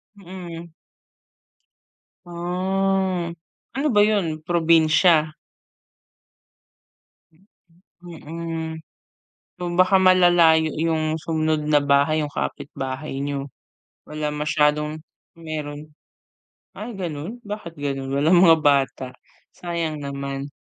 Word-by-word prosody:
Mm. 175 -3 -9 1.6
Ah 185 +1 -1 0.5
ano 295 +2 +1
ba 205 - +5
'yon 190 -8 +1
probinsya? 160 -1 +3 2.5
Mm, 175 -3 -14
mm. 165 0 -5 0.9
O - - -2
baka 185 +1 +4
malalayo 175 -4 +5
yung 160 0 0
sumunod 155 -1 0
na 150 - +6
bahay 145 +2 +2
yung 145 - -7
kapit-bahay 135 0 -5
niyo? 140 -1 -3 0.6
Wala 150 0 -3
masyadong, 150 +1 0 0.3
meron. 155 -2 -7 0.9
Ay 215 +5 -7
ganon 175 +6 -5
bakit 205 -6 -7
ganon 135 -2 -3
walang 160 +6 +4
mga 165 -3 +7
bata, 135 -3 +1 0.5
sayang 165 -4 -4
naman. 140 0 -5
160 Hz, 85 wpm, -22 LUFS, 150-175 Hz, 2.5 s, mga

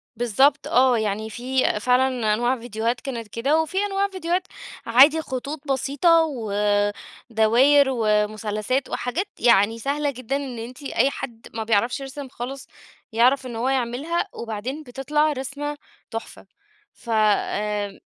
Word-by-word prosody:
بالضبط 265 +5 +2
آه، 255 0 +4
يعني 220 0 -2
في 255 -1 0
فعلًا 250 -2 +2
أنواع 240 +3 0
فيديوهات 230 +1 -2
كانت 235 -5 -5
كده، 275 +9 +1
وفي 320 +4 -5
أنواع 395 0 0
فيديوهات 365 -1 -2 0.4
عادي 280 +7 +6
خطوط 275 +2 -5
بسيطة، 285 +5 +3
ودواير، 220 +2 +2
ومثلثات، 215 +2 0
وحاجات 305 +12 -2
يعني 225 -1 +4
سهلة 285 +2 -1
جدًا 255 +1 -4
إن 265 -4 -4
أنتِ 250 +5 -9
أي 275 0 +2
حد 235 -5 -8
ما 225 - -3
بيعرفش 225 +4 +1
يرسم 275 0 -7
خالص 260 +3 -7 0.4
يعرف 255 +4 +3
إن 240 -2 -6
هو 245 +3 0
يعملها، 270 - -1
وبعدين 235 +7 -5
بتطلع 295 +4 0
رسمة 285 +2 -4 0.3
تحفة 225 0 -7 0.5
ف 235 - -15
آآ 210 -1 0
250 Hz, 130 wpm, -23 LUFS, 225-280 Hz, 0.5 s, عادي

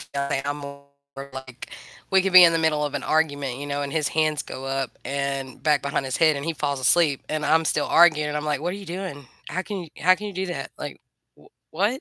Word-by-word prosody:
I'm 140 +1 -1
more, 140 0 -9 0.5
like 130 -1 -9 0.4
we 190 0 +5
could 195 0 -2
be 185 -1 +11
in 165 -1 +6
the 165 - +2
middle 155 -2 +1
of 145 - -5
an - - -3
argument, 145 -5 0
you 145 - -5
know, 145 0 -2
and 140 +1 -5
his 155 -2 +1
hands 155 -1 +1
go 135 - -8
up 135 -1 -2 0.2
and 140 -1 -3
back 150 -1 +2
behind 140 -1 -1
his 130 - -2
head 155 -2 +4
and 140 - -5
he 165 - -1
falls 140 -2 -2
asleep 145 0 +3
and 155 -1 -2
I'm 160 0 +3
still 150 -1 +1
arguing. 150 -3 +4
I'm 150 0 -2
like, 150 -2 -1
"What 175 +3 -2
are - - -5
you 200 - -10
doing? 175 -5 -6 0.2
How 185 - -2
can 195 -1 -5
you 165 - -11
how 185 +3 +5
can 210 +1 -7
you 200 - -7
do 190 +1 -3
that?" 155 -6 -5
Like, - - -6 0.8
"W 210 - 0
150 Hz, 240 wpm, -24 LUFS, 140-170 Hz, 0.8 s, be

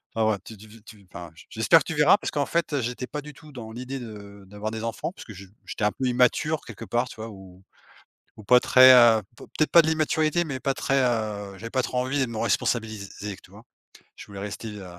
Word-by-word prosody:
enfin 110 -1 +2
ouais 105 - -1
tu 110 - -10
tu 110 +2 -16
tu 105 -3 -15
enfin 85 -4 -9 0.2
j'espère - - +4
que - - -6
tu - - -4
verras - - +6
parce - - -5
qu'en - - -1
fait, 170 -1 -1
heu, 145 - +1
j'étais 125 +1 -4
pas 150 - -5
du 150 +1 -11
tout 155 +2 -16
dans 115 -5 -9
l'idée 130 +3 -6
de 100 -4 -11
d'avoir 105 +2 -6
des 110 0 -6
enfants 115 +8 -4
puisque 120 -11 -12
je 100 0 -12 0.2
j'étais - - -6
un 105 - +3
peu 130 - -4
immature 125 +5 +1
quelque 115 - -9
part, 120 +1 -1
tu - - -12
vois? 110 +1 -7
Ou 95 -3 -14 0.8
ou - - -11
pas 125 +4 +6
très, 130 +1 +7
heu, 115 -3 +6
peut-être 155 +5 -3
pas 170 - +8
de 155 - -3
l'immaturité 160 +1 +1
mais 140 -6 -5
pas 135 +1 -1
très, 135 +1 +1
heu, 105 -5 -2
j'avais 115 +4 -8
pas 130 - +1
trop 125 - -4
envie 130 +3 -1
de - - -2
me 115 - -6
responsabiliser, 110 -2 -2
tu - - -18
vois? - - -15 0.5
Je - - -10
voulais 100 -1 -10
rester 105 +3 -6
heu 105 -2 -9
115 Hz, 240 wpm, -25 LUFS, 105-130 Hz, 0.8 s, pas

